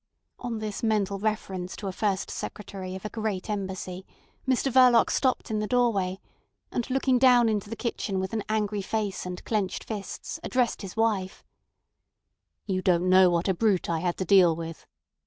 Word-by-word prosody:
On 240 -2 -4
this 215 -2 -4
mental 205 -3 0
reference 195 -4 -3
to - - -8
a 195 - -1
First 195 0 -1
Secretary 190 -2 -6
of 190 - -8
a - - -2
great 215 -3 -3
Embassy, 190 -2 -4 0.4
Mr 265 +1 +1
Verloc 250 -2 +6
stopped 255 -3 0
in 215 - 0
the 210 - -2
doorway, 200 -6 +1 0.5
and 240 - -2
looking 260 -1 +2
down 245 -2 +6
into 210 -2 -1
the 225 - -4
kitchen 220 -5 -2
with 190 +3 -3
an 220 - 0
angry 210 -1 0
face 200 -2 -2
and 180 0 -7
clenched 210 -4 -1
fists, 205 -4 -6
addressed 250 -2 0
his 195 0 -8
wife. 210 -5 0 1.2
"You 185 -2 -1
don't 180 -1 +2
know 185 0 +7
what 170 +1 0
a 190 - +3
brute 195 -2 +1
I 165 - 0
had 175 +1 -1
to 185 - -2
deal 180 -3 +6
with." 165 0 -7
205 Hz, 175 wpm, -27 LUFS, 185-225 Hz, 1.2 s, know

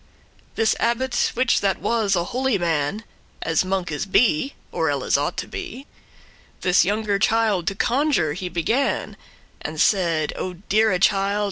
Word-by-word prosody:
This 225 -1 +2
abbot, 240 +2 +1
which 250 +1 +2
that 195 -1 +1
was 220 -4 +1
a 175 - +1
holy 255 +2 0
man, 170 +3 -1 0.4
As 165 +1 +1
monkes 185 -5 -2
be, 200 - +2 0.2
or - - 0
elles - - 0
ought - - -1
to - - -3
be, 350 -8 -7 0.8
This 180 0 +4
younger 205 +1 0
child 215 -5 +1
to 195 - 0
conjure 250 - +1
he 180 +2 -5
began, 220 - -1 0.5
And 155 0 -6
said; 165 -6 +2
"O 185 - -4
deare 205 +1 +1
child! 195 +2 +2
200 Hz, 145 wpm, -22 LUFS, 175-230 Hz, 0.8 s, This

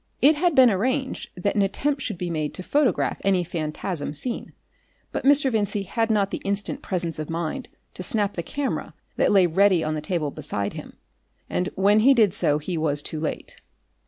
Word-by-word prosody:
It 295 +3 +6
had 340 +1 +1
been 255 -3 +7
arranged 260 +7 -1
that 200 +3 0
an 205 - +2
attempt 275 +8 0
should 215 -8 -3
be 175 0 -3
made 155 -2 -2
to 185 - -6
photograph 220 - +1
any 190 -2 +2
phantasm 155 -1 -4
seen, 240 - -3 0.6
but - - -4
Mr. 275 -1 +4
Vincey 205 -2 0
had 225 +4 -1
not 205 -3 +1
the - - -3
instant 200 0 -2
presence 170 -4 -2
of 155 - -5
mind 165 -1 -3 0.2
to - - -6
snap 205 +2 +1
the 170 - -3
camera 275 - -4 0.2
that - - +3
lay 195 -3 +6
ready 185 0 +3
on 155 - -1
the 155 - -3
table 155 -2 -2
beside 135 -10 -3
him, - - -10 0.5
and 180 +2 0
when 200 +3 +4
he 270 +5 +6
did 215 -6 +4
so 150 -7 +2
he 160 +2 -3
was 145 -2 +1
too 155 - -5
late. 155 - -5
195 Hz, 195 wpm, -24 LUFS, 160-225 Hz, 0.6 s, been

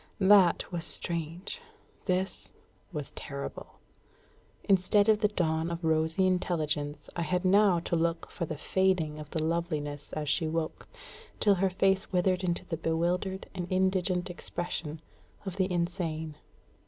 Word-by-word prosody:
That 190 -3 +5
was 170 -2 -2
strange; 170 - -3 0.4
this 185 +1 -1 0.4
was - - -4
terrible. - - -7 0.9
Instead 200 +1 +4
of 215 -1 +5
the 210 - +4
dawn 165 -5 0
of 170 0 -4
rosy 160 +3 +2
intelligence 155 -5 -1
I 170 - -1
had 180 +3 0
now 195 -1 +5
to 170 - -1
look 165 0 0
for 170 - -3
the 155 - -4
fading 170 -3 +1
of 150 -1 -8
the 160 0 -1
loveliness 155 -3 -2
as 155 -1 -3
she 160 +3 +2
woke, 160 0 -3 0.5
till 205 - +5
her 195 0 +2
face 195 +2 +1
withered 185 0 +2
into 175 0 0
the 165 -3 -3
bewildered 175 +4 -1
and 180 -2 -4
indigent 185 -1 +1
expression 165 -3 -4 0.4
of 190 -1 -5
the 190 -1 +1
insane. 170 -3 -2
175 Hz, 140 wpm, -30 LUFS, 160-190 Hz, 0.9 s, That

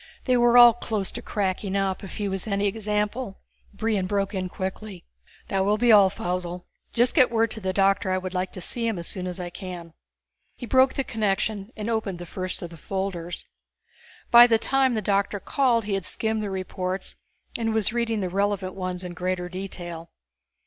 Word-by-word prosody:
They 255 - +2
were 240 0 +5
all 240 -1 +10
close 215 -4 -2
to - - -6
cracking 195 -1 -2
up, 195 -1 -1
if 195 - -8
he 205 - -1
was 195 +1 -2
any 200 -1 0
example. 210 +2 -2 0.3
Brion 210 -3 -1
broke 200 +1 -1
in 185 -1 -2
quickly. 190 0 -6 0.4
"That 195 -1 +1
will 205 +2 +2
be 240 +1 +4
all, 200 -3 +7
Faussel. 180 -2 -4 0.3
Just 240 +1 +2
get 260 -6 +5
word 225 -1 +1
to 220 - -5
the 190 -1 -1
doctor 195 0 +2
that 185 - +2
I - - +1
would 185 0 -5
like 185 0 -2
to 185 - -6
see 230 +6 0
him 225 -4 -1
as 170 - -5
soon 185 +1 -4
as 180 +1 -5
I 175 -1 -5
can." 175 -3 -8 0.6
He 245 - -7
broke 260 +2 +4
the 275 - 0
connection 210 -2 -1
and 210 0 -4
opened 220 -5 -1
the 175 - -8
first 185 +1 -5
of 175 - -7
the 165 - -11
folders. 180 -1 -4 0.9
By 240 0 +10
the 225 -2 +4
time 265 +1 +2
the 215 - -2
doctor 200 +1 +1
called 240 0 +1
he 205 - -2
had 195 -2 -1
skimmed 220 -1 -1
the 210 - -3
reports 185 0 -4 0.4
and 225 -1 0
was 220 0 +1
reading 230 -3 0
the 185 - -1
relevant 200 0 -1
ones 185 -1 -4
in 180 -1 -6
greater 180 0 -2
detail. 175 -3 -7
195 Hz, 205 wpm, -25 LUFS, 185-220 Hz, 0.9 s, all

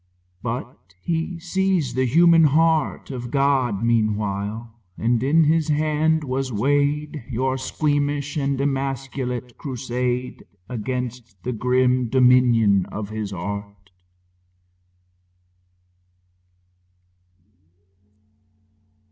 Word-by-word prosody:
But 115 -6 -6
he 165 - -2
sees 180 -5 0
the 130 +1 +1
human 165 +4 +6
heart 160 0 +2
Of 125 -2 -5
God 135 -6 +1
meanwhile, 110 -1 -1 0.3
and 115 0 +1
in 155 +5 +4
His 155 0 +2
hand 155 +1 +1
was 130 -1 -2
weighed 145 +5 0
Your 130 +2 0
squeamish 145 +1 -1
and 140 -2 -1
emasculate 135 -3 -3
crusade 125 -2 -3 0.2
Against 125 -3 -5
the 125 - -2
grim 125 +1 +1
dominion 120 -6 +4
of 105 -1 -6
his 110 -2 -4
art. 100 +1 -6
130 Hz, 85 wpm, -22 LUFS, 115-145 Hz, 0.3 s, human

